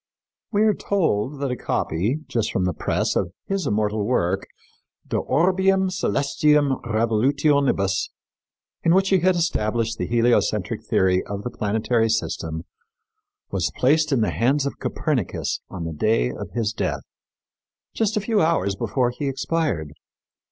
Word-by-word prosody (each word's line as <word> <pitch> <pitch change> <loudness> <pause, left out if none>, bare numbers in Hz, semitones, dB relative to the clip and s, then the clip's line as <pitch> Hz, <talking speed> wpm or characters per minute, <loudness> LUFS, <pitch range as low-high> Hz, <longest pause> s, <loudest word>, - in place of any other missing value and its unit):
We 210 -1 +3
are 215 -1 +4
told 145 - -1
that 140 -2 -1
a - - -1
copy, 110 - -1
just 115 -4 -1
from 95 - 0
the 90 - 0
press, - - -1
of 85 - -1
his 195 -6 -2
immortal 105 0 0
work, 95 -4 0 0.6
De - - -1
Orbium 190 +5 +2
Celestium 145 -4 +1
Revolutionibus, 115 -2 +1 0.7
in 165 +1 +3
which 195 0 +3
he 190 - +4
had 185 +2 +3
established 115 -8 0
the - - -1
heliocentric 120 +1 +1
theory 95 -1 +2
of 100 0 -5
the 125 - -4
planetary 110 +2 0
system, 80 -7 -2 0.9
was - - 0
placed 150 +4 +3
in 130 -4 +2
the 110 - +1
hands 135 +5 +1
of 140 - -4
Copernicus 135 - -2
on 90 -3 -6
the 80 -1 -4
day 75 - +1
of - - -7
his 110 -2 -1
death, - - -2 0.9
just 220 -1 0
a - - +1
few 215 +1 +1
hours 130 - +1
before 120 +3 0
he 140 +3 -4
expired. 135 - -1
125 Hz, 145 wpm, -23 LUFS, 105-155 Hz, 0.9 s, are